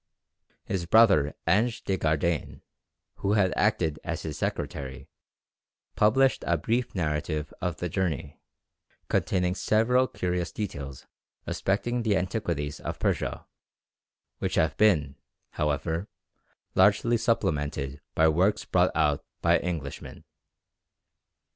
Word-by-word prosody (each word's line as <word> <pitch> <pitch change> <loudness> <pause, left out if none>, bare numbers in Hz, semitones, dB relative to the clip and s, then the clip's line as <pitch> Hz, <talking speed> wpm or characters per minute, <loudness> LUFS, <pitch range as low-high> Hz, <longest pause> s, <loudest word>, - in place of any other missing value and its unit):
His 85 -3 -3
brother 95 -9 +5
Ange 110 +8 +2
de 95 - 0
Gardane, 80 -1 -1 0.5
who 100 - 0
had 95 -4 +3
acted 85 -8 +1
as - - -4
his - - -4
secretary, 65 -1 -4 0.9
published 130 +6 +3
a 85 - +3
brief 115 +10 -1
narrative 75 -2 -2
of 90 -3 -2
the 90 - -2
journey, 80 -4 -3 0.7
containing 90 -2 +1
several 120 +6 +2
curious 90 -4 -2
details 70 - -6 0.4
respecting 120 +5 -1
the 110 -4 +2
antiquities 90 -7 -2
of - - -5
Persia, - - -1 0.9
which - - -2
have 80 - +2
been, 75 -10 +3 0.3
however, 80 +5 -1 0.7
largely 105 +5 +4
supplemented 75 - -1
by 80 - +5
works 90 +6 +2
brought - - +3
out 75 -3 +2 0.2
by - - +4
Englishmen. 80 -6 -5
90 Hz, 110 wpm, -27 LUFS, 75-105 Hz, 0.9 s, brother